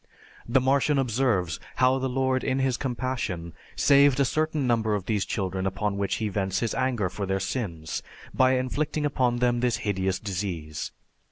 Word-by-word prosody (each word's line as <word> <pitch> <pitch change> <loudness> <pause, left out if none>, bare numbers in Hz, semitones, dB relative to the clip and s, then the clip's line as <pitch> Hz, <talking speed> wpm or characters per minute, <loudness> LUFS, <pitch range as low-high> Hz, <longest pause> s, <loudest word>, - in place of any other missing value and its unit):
The 135 - +4
Martian 140 +3 +2
observes 115 -10 +1 0.2
how 130 +1 +3
the 130 0 -1
Lord 130 0 0
in 130 - 0
His 135 -2 +1
compassion 120 -10 -3 0.2
saved 140 -1 +5
a 140 - +4
certain 155 -1 0
number 110 -3 +2
of 100 -3 -3
these 105 -2 0
children 95 -3 -2
upon 105 +2 -1
whom 100 0 0
he 110 - -1
vents 95 -1 -1
His 115 - -1
anger 125 -7 0
for 100 +2 -4
their 95 0 0
sins, 90 -6 -3 0.3
by 130 0 +4
inflicting 150 +4 -1
upon 125 -4 +1
them 120 0 +2
this 125 -1 +1
hideous 95 -2 0
disease. 90 -6 -4
120 Hz, 170 wpm, -26 LUFS, 95-130 Hz, 0.3 s, saved